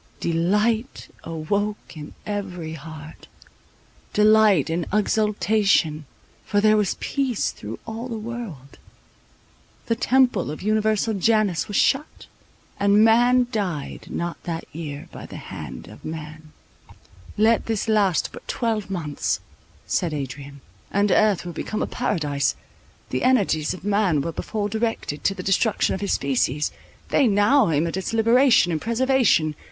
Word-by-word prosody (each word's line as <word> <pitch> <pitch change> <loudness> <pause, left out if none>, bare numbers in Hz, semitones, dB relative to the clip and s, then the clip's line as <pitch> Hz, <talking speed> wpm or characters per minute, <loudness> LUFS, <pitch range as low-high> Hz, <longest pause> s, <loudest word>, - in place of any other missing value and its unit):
Delight 210 +9 0
awoke 200 +6 -3
in 150 -1 -9
every 185 -6 -4
heart, 155 0 -10 0.9
delight 210 -6 +5
and 165 +1 -2
exultation; 210 -7 +1 0.4
for 205 - 0
there 215 +1 +5
was 210 -3 +1
peace 265 -6 -1
through 105 +2 -8
all 225 +2 -5
the 230 -3 -4
world; 215 - -7 1.1
the 230 - 0
temple 250 - +2
of 150 - -6
Universal 215 +1 +1
Janus 205 -3 +1
was 205 - -2
shut, 280 +3 +1 0.5
and 200 +2 +5
man 245 +2 +5
died 185 - -3
not 170 0 -4
that 165 -1 -4
year 150 -3 -6
by - - -9
the - - -9
hand - - -8
of - - -14
man. 155 0 -8 0.9
"Let 220 +2 +3
this 225 -2 -1
last 205 -5 +2
but - - -11
twelve 220 -4 -1
months," 160 -6 -2 0.5
said 165 -4 -1
Adrian; 140 0 -7 0.3
"and 200 0 +1
earth 205 -4 +3
will 175 - -5
become 210 +6 -3
a - - 0
Paradise. 145 - -1 0.6
The 130 - -1
energies 195 -13 +2
of 180 - -13
man 200 -7 +2
were 165 - -3
before 205 +5 -3
directed 220 -8 -2
to 195 - +2
the 185 - -6
destruction 195 +3 +1
of 190 - -4
his 200 - 0
species: 140 +1 0 0.4
they 275 - +3
now 210 +3 +4
aim 155 +1 +1
at 170 - -3
its 190 +3 -3
liberation 230 -3 +4
and 160 - -2
preservation. 235 - +2
200 Hz, 140 wpm, -23 LUFS, 160-220 Hz, 1.1 s, delight